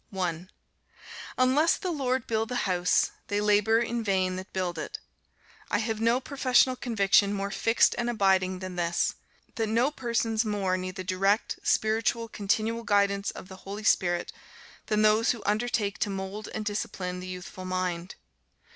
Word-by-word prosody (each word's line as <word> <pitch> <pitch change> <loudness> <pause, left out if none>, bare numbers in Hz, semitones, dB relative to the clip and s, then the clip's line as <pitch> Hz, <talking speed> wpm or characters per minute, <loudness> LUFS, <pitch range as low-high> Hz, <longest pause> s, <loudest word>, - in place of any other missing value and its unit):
1. 180 -2 -3 0.9
"Unless 265 +6 +3
the 365 - -3
Lord 260 -5 -1
build 220 0 -1
the 250 - -3
house, 180 -2 +2 0.2
they 205 - 0
labor 210 +1 +3
in 235 0 -2
vain 190 -3 +1
that 185 +1 -7
build 180 -3 -2
it." - - -5 0.7
I - - +2
have 220 0 -2
no 230 +2 +3
professional 260 -1 +2
conviction 200 -4 +3
more 200 0 -3
fixed 225 +3 +3
and 240 0 0
abiding 190 -4 +2
than 185 -1 -6
this, 170 0 +1 0.4
that 225 -1 0
no 235 +6 +2
persons 230 -4 0
more 200 -4 0
need 185 0 -4
the 185 - -5
direct, 195 +3 0
special, 225 +1 +1
continual 220 +2 -1
guidance 200 -1 +2
of - - -8
the 190 -1 -11
Holy 200 +2 -7
Spirit 175 -4 +1 0.5
than 215 0 +2
those 215 +3 +4
who 230 - -9
undertake 210 -1 0
to 210 - 0
mould 195 +2 -5
and 215 - -4
discipline 190 -3 -3
the 180 - -7
youthful 185 0 -8
mind. 185 -1 -3
205 Hz, 160 wpm, -28 LUFS, 185-230 Hz, 0.9 s, those